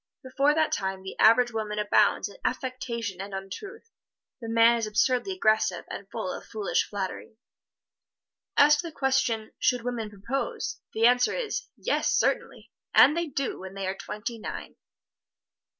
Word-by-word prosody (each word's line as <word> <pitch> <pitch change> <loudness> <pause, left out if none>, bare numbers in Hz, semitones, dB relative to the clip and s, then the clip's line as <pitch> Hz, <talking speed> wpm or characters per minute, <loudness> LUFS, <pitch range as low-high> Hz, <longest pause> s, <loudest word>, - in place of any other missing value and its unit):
Before 275 +3 +2
that 315 -1 +2
time 190 -1 -2
the 190 - -7
average 240 +2 +6
woman 215 -2 -3
abounds 210 -1 +3
in 200 - -13
affectation 235 -6 -3
and 195 0 -6
untruth; 385 - -8 0.5
the 230 - -6
man 230 +1 +5
is 225 -2 -2
absurdly 250 - +1
aggressive 215 - +1
and 195 -1 -7
full 185 - -4
of - - -7
foolish 215 -3 -1
flattery. 200 +2 -5 1.2
As 295 +1 +7
to 335 - -3
the - - -7
question, 240 -5 0
"Should 250 -2 +1
women 235 -3 -3
propose?" 210 +7 -4
the 225 +1 +2
answer 245 +1 +4
is, - - -3
"Yes, - - 0
certainly, - - -1 0.2
and 300 - +7
they 340 0 -1
do 275 -2 -3
when 190 +1 -9
they 195 -1 -4
are 190 - -1
twenty 220 +4 -6
nine." - - -7
230 Hz, 155 wpm, -27 LUFS, 205-260 Hz, 1.2 s, As